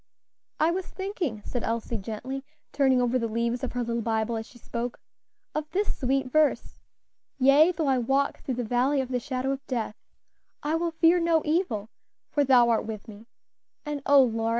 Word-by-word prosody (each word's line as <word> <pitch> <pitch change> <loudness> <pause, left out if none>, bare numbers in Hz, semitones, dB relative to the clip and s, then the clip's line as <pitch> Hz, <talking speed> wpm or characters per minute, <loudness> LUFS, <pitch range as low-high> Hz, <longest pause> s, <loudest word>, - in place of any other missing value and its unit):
"I 315 +2 +4
was 370 +1 -3
thinking," 355 - -4
said 245 - -3
Elsie 230 0 -2
gently, 235 +6 -5 0.3
turning 265 -3 +3
over 245 +1 +2
the 230 - -1
leaves 235 +3 -1
of 260 - -3
her 245 -1 -1
little 235 0 -2
Bible 220 0 0
as 225 0 -4
she 245 - -16
spoke, 235 +1 -5 0.5
"of 305 0 -3
this 405 +3 0
sweet 265 -1 0
verse: 310 0 +1 0.6
'Yea, 280 +6 +6
though 320 -2 -1
I 265 -2 +2
walk 270 +4 0
through 260 - -3
the 245 - -2
valley 250 +5 +1
of 260 -1 -2
the 250 -1 0
shadow 255 +2 -2
of 275 0 -4
death, 230 -5 -2 0.7
I 300 +2 0
will 335 +1 +1
fear 330 +2 +4
no 335 -2 +2
evil; 300 - 0 0.4
for 290 - +2
thou 250 -3 +5
art 230 - +2
with 220 0 -6
me;' 215 +1 -12 0.6
and 295 -1 -3
oh, 280 -1 +7
Lora! 225 -2 0
255 Hz, 190 wpm, -27 LUFS, 235-295 Hz, 0.7 s, oh